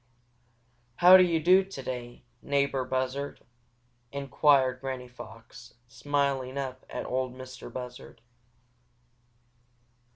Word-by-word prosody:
"How 180 +6 +8
do 185 - +9
you 170 -3 +3
do 185 +4 +5
today, 130 -9 -7 0.2
neighbor 140 -2 0
Buzzard?" 130 +2 -3 0.7
inquired 140 -2 +2
Granny 130 -2 -5
Fox, 120 -3 -13
smiling 135 0 -1
up 130 -1 -5
at - - -5
Ol' 130 0 -1
Mistah 130 0 -10
Buzzard. 125 -1 -9
130 Hz, 95 wpm, -28 LUFS, 125-140 Hz, 0.7 s, do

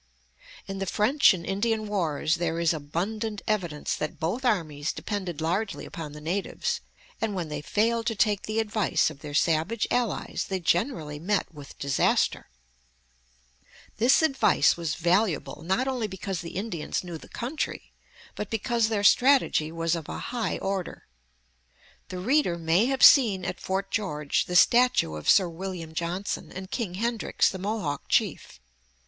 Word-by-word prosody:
In 195 0 -6
the 195 - -3
French 240 - +4
and 170 -3 -3
Indian 215 +3 0
wars 165 -6 0
there 165 -1 -1
is 170 0 +2
abundant 200 +8 -3
evidence 175 -8 -1
that 155 - -5
both 190 +11 -2
armies 160 - 0
depended 185 -6 -4
largely 195 +6 -1
upon 160 -6 -7
the 150 - -9
natives, 175 +6 -2 0.4
and 225 -2 -1
that - - -5
when 175 -4 -3
they 150 -1 -4
failed 225 +7 0
to 225 - 0
take 205 -1 +2
the 215 +1 -2
advice 210 -8 +1
of 145 - -13
their 145 0 -7
savage 165 +9 +1
allies 245 -3 -1
they 190 -1 -1
generally 170 - -1
met 190 +1 -1
with 145 -2 -12
disaster. 140 -1 +1 1.5
This 245 +8 +4
advice 275 -4 +3
was 165 -3 -3
valuable, 175 0 0
not 190 +10 0
only 250 -5 -1
because 190 -2 -5
the 170 - -8
Indians 185 -6 -3
knew 175 -3 -7
the - - -15
country, 265 +7 -4 0.4
but 210 - -5
because 225 +1 0
their 210 -2 -1
strategy 250 - +4
was 165 0 -1
of 165 -3 -6
a - - -4 0.2
high 240 -2 -1
order. 195 -2 -4 1.0
The 185 - -5
reader 205 - +1
may 170 +7 +2
have 270 0 0
seen 215 - +7
at - - -4
Fort 195 +1 -3
George 150 -9 -1
the 180 - -4
statue 240 - +4
of 75 0 -3
Sir 190 - +6
William 170 -1 -6
Johnson 170 +4 -3
and 190 +1 -8
King 215 -8 -3
Hendrix, 230 +3 +1
the 190 - -6
Mohawk 190 -8 -3
chief. - - 0
190 Hz, 160 wpm, -27 LUFS, 165-220 Hz, 1.5 s, seen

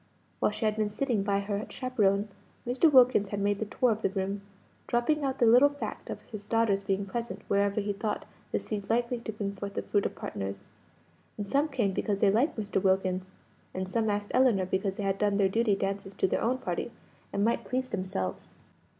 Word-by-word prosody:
While - - +3
she 210 +1 -3
had 215 0 +1
been 215 -1 +1
sitting 230 0 0
by 200 0 +1
her 200 +1 -2
chaperone, 210 -5 +1 0.4
Mr. 255 +6 +3
Wilkins 250 -6 +6
had 205 - -3
made 200 0 +1
the 220 - -1
tour 245 +3 +1
of 220 0 -2
the - - +2
room, 195 +1 -2 0.5
dropping 285 +6 +1
out 270 -1 -1
the 240 - +4
little 250 +5 +7
fact 285 0 -6
of - - -6
his 210 -2 -9
daughter's 225 -4 +2
being 195 0 -1
present 235 +4 -5
wherever 200 +1 +2
he 205 0 -1
thought 210 +1 -3 0.3
the - - +1
seed 205 -2 -5
likely 240 +1 +1
to 230 - -5
bring 200 -2 -3
forth 200 0 -6
the - - -2
fruit 205 - +1
of - - -10
partners. 100 0 -5 0.7
And 205 - -4
some 285 +7 +2
came 245 -9 0
because 200 +1 -1
they 200 - +5
liked 245 +9 +2
Mr. 205 -2 -1
Wilkins, 190 -1 +1 0.5
and 185 0 -2
some 220 +3 0
asked 205 0 -2
Ellinor 245 -7 +4
because 190 +1 -1
they 205 - -4
had 195 0 0
done 205 -1 +2
their 195 -2 +3
duty 225 0 +2
dances 195 0 -3
to 190 - +2
their - - 0
own 250 +3 +1
party, 260 - -3 0.4
and 200 +1 +1
might 230 - +1
please 255 0 -2
themselves. 185 - -3
205 Hz, 210 wpm, -29 LUFS, 195-235 Hz, 0.7 s, little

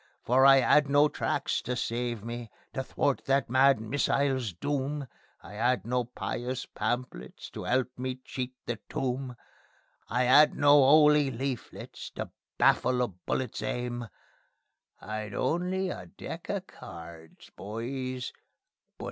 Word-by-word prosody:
For 130 +3 +5
I 135 0 +8
'ad 145 +2 +4
no 145 +1 +5
tracts - - -1
to 125 - -3
save 120 -3 -2
me, 120 0 -6 0.2
to 135 - -2
thwart 135 +1 0
that 135 -3 +1
mad 135 -1 +5
missile's 130 0 0
doom; 140 - -2 0.4
I 90 - -11
'ad 120 -1 +1
no 125 +1 0
pious 125 +1 -4
pamphlets 110 - -4
to - - -6
'elp 130 0 0
me 130 0 -2
to 130 - -27
cheat 130 -1 -5
the 120 -3 -3
tomb; 130 -1 -2 0.7
I 125 +2 +1
'ad 145 +5 +6
no 145 0 +6
'oly 150 0 +6
leaflets 130 0 -5
to - - -5 0.3
baffle 125 0 +3
a 120 - -1
bullet's 105 +6 -3
aim; 120 +1 -3 0.9
I'd 110 -1 -5
only 180 +6 0
a 90 - -7
deck - - -8
of - - -2
cards, 80 -1 -12
boys, 125 +4 -5 0.6
but - - -51
125 Hz, 140 wpm, -29 LUFS, 115-135 Hz, 0.9 s, I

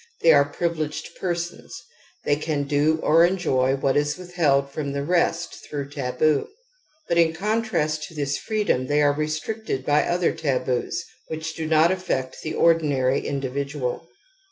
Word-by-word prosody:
They 165 - +7
are 140 -1 +5
privileged 155 -3 -3
persons, 175 -2 -4 0.5
they 145 - +3
can 150 -1 -2
do 150 +2 +2
or 165 +2 +5
enjoy 145 -8 +2
what 135 0 0
is 145 0 +1
withheld^ 170 -7 +1
from 140 0 -4
the 140 0 -2
rest 170 +1 0
through 140 -2 -5
taboo. 140 +1 +1 0.6
But 170 - +2
in 165 -1 +4
contrast 185 -5 -1
' - - -5
to 165 - -15
this 145 -1 -1
freedom 210 - 0
they 150 +1 +2
are 145 0 +4
restricted 155 +1 -3
by 150 0 +4
other 175 0 +1
taboos 130 -4 -1 0.2
which 160 0 -4
do 160 -1 -4
"Hot 160 +2 +5
affect 180 -9 -2
the 155 - -4
ordinary 145 -6 +2
individual. 140 -1 -3
150 Hz, 155 wpm, -24 LUFS, 140-170 Hz, 0.6 s, They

